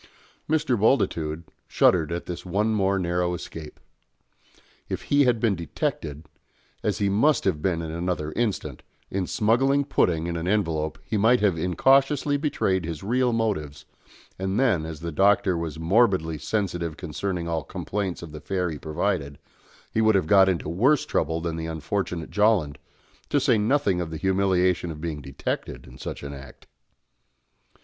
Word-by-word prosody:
Mr. 155 -4 +2
Bultitude 85 - +1 0.2
shuddered 85 -4 +3
at 85 +1 -3
this 90 - -6
one 100 +5 0
more 100 -2 +2
narrow 90 -1 0
escape. 80 -2 -9 1.1
If - - -4
he 145 -1 +3
had 120 -2 +2
been 110 -2 +2
detected 80 -3 -4 0.6
as 105 -2 -1
he 100 -2 +1
must 115 +9 +3
have 85 -6 0
been 85 -1 0
in 80 - -5
another 85 -2 -2
instant 95 - -2 0.3
in 95 -2 -1
smuggling 135 +6 +2
pudding 85 - +1
in 85 0 -2
an 85 +1 -3
envelope 80 -7 0
he 80 +8 -2
might 115 +4 +4
have 100 -5 +3
incautiously 135 - +2
betrayed 120 - 0
his 80 0 -5
real 125 +4 +1
motives, 95 -11 -2 0.5
and 95 +3 -1
then, 95 -12 +2
as 80 -2 -7
the 85 0 -4
Doctor 95 +1 +3
was 85 -2 -4
morbidly 85 -3 +2
sensitive 85 -3 -2
concerning 90 +1 -3
all 80 -2 -1
complaints 95 -4 -4
of 80 - -9
the 75 -1 -9
fare 90 0 -1
he 75 - -6
provided, 80 -2 -2 0.5
he 110 - +1
would 110 -1 +4
have 95 - +2
got 95 +3 +6
into 90 -4 -1
worse 125 - +2
trouble 80 +1 -1
than 85 -1 -3
the 80 0 -4
unfortunate 80 +1 -3
Jolland, 105 -9 +2 0.5
to 145 - +3
say 125 -5 +3
nothing 105 -5 +1
of 85 - -4
the 80 - -5
humiliation 95 -1 +1
of 75 -2 -7
being 80 -2 -4
detected 70 -2 -5
in - - -14
such - - -6
an 70 0 -6
act. 70 -2 -12
90 Hz, 165 wpm, -25 LUFS, 80-105 Hz, 1.1 s, got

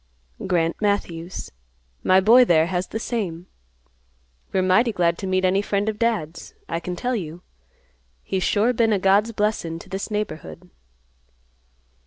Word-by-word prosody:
"Grant 170 -1 0
Matthews. 185 -4 -2 0.5
My 185 0 +5
boy 230 +6 +7
there 165 -8 +4
has 180 +1 -2
the - - -4
same. 195 -8 -3 1.1
We're 190 - +1
mighty 215 +6 +3
glad 170 -4 +1
to 195 - -4
meet 185 0 +1
any 190 +2 +2
friend 205 0 -1
of 215 -1 -2
Dad's, 190 -9 -2
I 165 - -2
can 180 +1 -5
tell 245 +8 -2
you. 175 -4 -6 0.8
He's 190 -1 -2
sure 220 +6 +2
been 225 -2 +2
a - - +3
God's 195 +4 +3
blessin' 210 -6 -1
to - - -13
this 195 +3 -4
neighborhood." 180 -4 -5
190 Hz, 150 wpm, -23 LUFS, 175-215 Hz, 1.1 s, boy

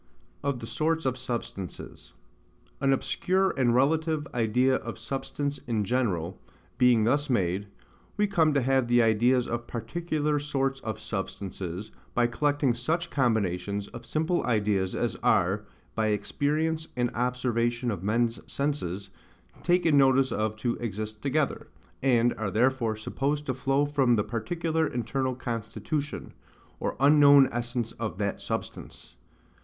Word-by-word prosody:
Of 140 -4 -2
the - - -5
Sorts 160 +5 0
of 130 -1 +1
Substances. 120 -7 -6 0.7
An 135 0 +2
obscure 185 +7 +1
and 120 -3 +2
relative 155 +3 +2
idea 125 +3 +2
of - - -7
SUBSTANCE 140 +1 -3
IN 110 -3 0
GENERAL 95 -8 -1 0.4
being 125 -3 +5
thus 145 +6 +1
made 100 -4 0 0.5
we 210 - +3
come 170 -6 +3
to 140 - +3
have 130 -1 +2
the 120 0 +4
ideas 120 +3 +3
of 120 0 -3
PARTICULAR 150 +5 -1
SORTS 135 -2 -1
OF 110 - -4
SUBSTANCES, 95 -1 -5 0.2
by 120 - +4
collecting 145 +2 +1
SUCH 165 +9 -2
combinations 100 -5 0
of 120 - -9
simple 160 +3 0
ideas 105 -5 +1
as - - -1
are, 100 +4 +2 0.3
by 110 -1 0
experience 155 +9 0
and 120 0 +1
observation 120 -1 0
of 95 -5 -4
men's 115 +3 +1
senses, 100 -10 -2 0.5
taken 170 -5 +3
notice 135 0 +4
of 110 0 -1
to 120 +2 -2
exist 110 -1 -5
together; 145 +1 0 0.3
and 120 -2 +3
are 110 -3 -1
therefore 120 0 +1
supposed 140 +7 -2
to 130 - -1
flow 135 +2 +1
from 135 -4 +3
the 105 - +1
particular 160 +9 -1
internal 130 +2 -2
constitution, 120 +4 -4 0.5
or - - -2
unknown 140 -1 +7
essence 120 -1 -2
of 110 -7 -5
that 100 -1 -2
substance. - - -6
125 Hz, 135 wpm, -28 LUFS, 110-145 Hz, 0.7 s, unknown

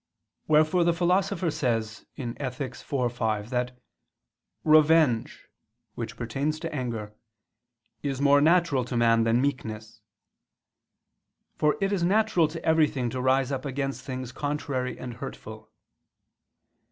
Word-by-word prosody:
Wherefore 155 +3 +4
the 170 0 +2
Philosopher 180 0 +1
says 115 -6 -2
(Ethic. 130 0 -4 0.2
iv, 125 -4 -1
5) 110 -2 -2
that 125 0 -2 0.9
"revenge" 155 -6 +3 0.5
which 115 -1 -6
pertains 135 +7 -2
to 165 -1 -4
anger 115 -6 -4 0.9
"is 135 -2 -3
more 140 0 +5
natural 165 -4 +3
to 125 -1 -3
man 115 -1 +4
than 115 +1 +3
meekness": 110 -5 -3 1.5
for 150 0 +1
it 195 0 0
is 190 - 0
natural 195 -2 +3
to 160 +2 -8
everything 150 -7 +2
to 130 - -3
rise 130 +1 +2
up 130 -1 -3
against 135 0 -3
things 130 -2 -5
contrary 140 -3 -3
and 120 -2 -7
hurtful. - - -9
135 Hz, 120 wpm, -27 LUFS, 120-155 Hz, 1.5 s, more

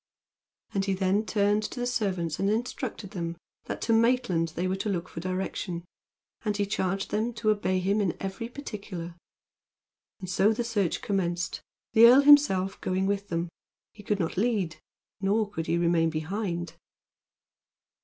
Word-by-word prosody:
And 195 - +1
he 195 -1 0
then 195 +3 +1
turned 205 0 +2
to 215 - -5
the 245 - -1
servants 190 -10 -1
and 195 - +2
instructed 225 -2 -3
them 170 -3 -4 0.3
that - - -5
to 230 - +2
Maitland 225 -7 +3
they 180 +2 -1
were 185 - 0
to 210 - -2
look 180 -3 -2
for - - -8
direction, 185 -1 -3 0.6
and 210 -2 -1
he 205 - +1
charged 195 -1 -2
them 225 +3 0
to 215 -1 +2
obey 205 -3 0
him 200 +3 +1
in 190 -4 -1
every 195 +4 -4
particular. 200 -10 -7 1.1
And 185 - -7
so 195 +4 +3
the 240 - -2
search 210 -7 -1
commenced, 180 -2 -1 0.3
the 230 +1 +9
earl 255 +4 +8
himself 280 -10 +5
going 185 +1 0
with 200 0 -1
them. 170 -1 -2 0.4
He 215 - -12
could 205 0 -1
not 165 0 -2
lead, 200 -6 0 0.4
nor 205 +2 +2
could 165 -5 -5
he 170 - +1
remain 170 -1 +3
behind. 170 +1 -3
195 Hz, 165 wpm, -28 LUFS, 180-215 Hz, 1.1 s, the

